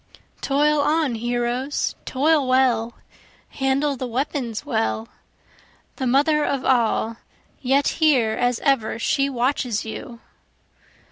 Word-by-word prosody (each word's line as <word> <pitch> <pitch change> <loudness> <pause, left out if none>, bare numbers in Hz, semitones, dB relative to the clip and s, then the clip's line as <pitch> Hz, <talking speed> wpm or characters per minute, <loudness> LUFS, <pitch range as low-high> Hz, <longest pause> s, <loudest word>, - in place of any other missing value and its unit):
Toil 295 +2 +2
on 300 -2 +1
heroes! 240 +4 -2
toil 290 +1 +2
well! 245 -3 +2 0.5
handle 275 +1 0
the 255 0 -5
weapons 245 -2 -3
well! 110 0 -1 0.9
The 260 - -2
Mother 295 +4 +3
of 275 -3 -2
All, 230 -2 +1 0.4
yet 275 +2 +2
here 260 -8 +4
as 245 +1 0
ever 265 -7 +1
she 275 +4 +1
watches 245 -3 -1
you. 230 +2 -8
260 Hz, 110 wpm, -22 LUFS, 235-280 Hz, 0.9 s, here